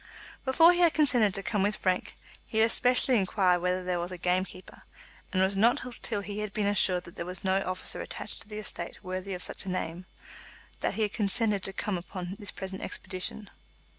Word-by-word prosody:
Before 325 +6 +6
he 350 - -1
had 340 -2 +5
consented 250 -10 +3
to 195 - -2
come 205 0 0
with 205 +1 +2
Frank, 185 -1 -1 0.3
he 220 - -4
had 220 - +7
especially 250 +1 +4
inquired 185 -2 +2
whether 180 +1 0
there 180 -1 -1
was 175 +1 -4
a 180 - -5
game 180 +2 +1
keeper, 185 0 -13 0.5
and 185 0 +2
it - - +6
was 195 +1 0
not 230 +5 +4 0.2
till 210 -3 -2
he 205 +1 -5
had 210 -1 -4
been 210 - 0
assured 190 -3 +2
that 170 - -13
there - - -2
was 180 +2 -5
no 190 0 +2
officer 185 -1 -2
attached - - -6
to - - -9
the 210 0 -7
estate 215 0 -5
worthy 185 +1 -4
of 180 - -2
such - - +2
a - - -4
name, 180 0 -4 0.7
that - - -1
he 220 - +1
had 210 - -1
consented 210 -1 +2
to 195 - -3
come 195 -1 -2
upon 180 +1 -6
his 205 - -3
present 190 0 -6
expedition. 190 +2 -5
195 Hz, 220 wpm, -29 LUFS, 185-215 Hz, 0.7 s, had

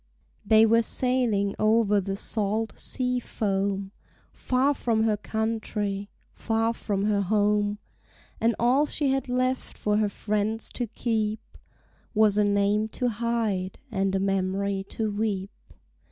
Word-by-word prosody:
They 220 +1 +6
were 230 +1 +4
sailing 230 -5 0
over 215 -1 +3
the 195 +1 -3
salt 215 +2 -1
sea 250 -1 -1
foam, 195 -3 -2 0.4
Far 260 +3 +1
from 225 -5 0
her 220 -1 +2
country, 210 -2 -3 0.2
far 225 0 0
from 205 -3 -2
her 210 -1 +2
home; 205 +1 +1 0.6
And 230 0 +2
all 260 +5 +3
she 290 -3 0
had 270 -1 -1
left 255 +1 -1
for 210 0 +1
her 210 -1 +2
friends 215 +2 -2
to 245 - -3
keep 220 -1 -1 0.8
Was 215 -1 +4
a - - +5
name 205 +1 +2
to 250 - +1
hide 220 -5 -1
and 195 -2 0
a - - +1
memory 195 0 0
to 220 -2 -2
weep! 205 -2 -2
215 Hz, 135 wpm, -26 LUFS, 200-230 Hz, 0.8 s, They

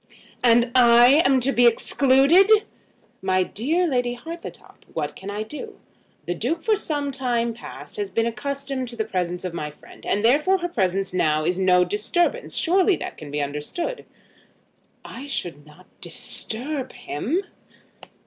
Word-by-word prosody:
"And 240 0 +4
I 245 +3 +6
am 265 -1 +4
to 270 +3 +2
be 245 -2 +5
excluded!" 275 - +4 0.7
"My 185 -1 +2
dear 305 - -1
Lady 245 -4 0
Hartletop, 330 +8 -10
what - - -3
can 195 - -8
I 205 +1 -3
do? 300 - -9 0.5
The 175 - -1
Duke 305 - -2
for 440 - +3
some 290 -8 -2
time 240 -3 -1
past 235 - -10
has 410 -2 -3
been 230 -9 0
accustomed 275 +2 -3
to 240 - -9
the 220 -2 -2
presence 180 -3 -3
of 180 - -4
my 150 -3 -4
friend, 150 - -17
and 205 +2 0
therefore 300 +10 +4
her 350 -1 -3
presence 195 - -1
now 155 -3 +1
is 180 +2 0
no 180 -1 +4
disturbance. 345 - -1
Surely 370 +2 +3
that - - -6
can 150 - -10
be 145 0 -2
understood." 150 - -4 1.0
"I 275 - -8
should 165 - -5
not 160 +5 -17 0.2
disturb 265 +4 -3
him." 245 - -3
240 Hz, 155 wpm, -23 LUFS, 185-290 Hz, 1.0 s, I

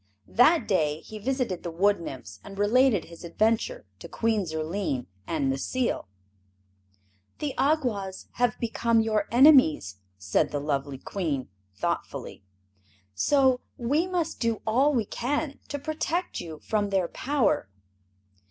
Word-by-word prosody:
That 310 +8 +5
day 155 -5 +1
he 215 - -9
visited 250 -6 -1
the 175 - -4
Wood 195 +4 +2
Nymphs 100 -11 -8
and 195 0 -10
related 215 -1 +3
his 170 +1 -13
adventure 225 - 0
to - - -10
Queen 220 -4 0
Zurline 160 -3 -2 0.2
and 150 -4 0
Necile. 240 - -1 1.3
"The 295 -3 -3
Awgwas 240 -11 0
have 245 -2 +1
become 230 0 +2
your 215 -2 0
enemies," 235 - +5 0.2
said 95 0 +1
the 145 - -2
lovely 140 -1 -2
Queen, 145 - -3 0.3
thoughtfully; - - -3 0.7
"so 260 - +3 0.2
we 290 +9 +1
must 355 -3 -2
do 230 -2 -1
all 255 +7 +3
we 235 -6 +1
can 280 +7 -2
to 285 - -3
protect 315 +4 -2
you 160 -3 -8
from 210 -2 0
their 190 -3 +1
power." 245 - 0
215 Hz, 130 wpm, -27 LUFS, 165-260 Hz, 1.3 s, That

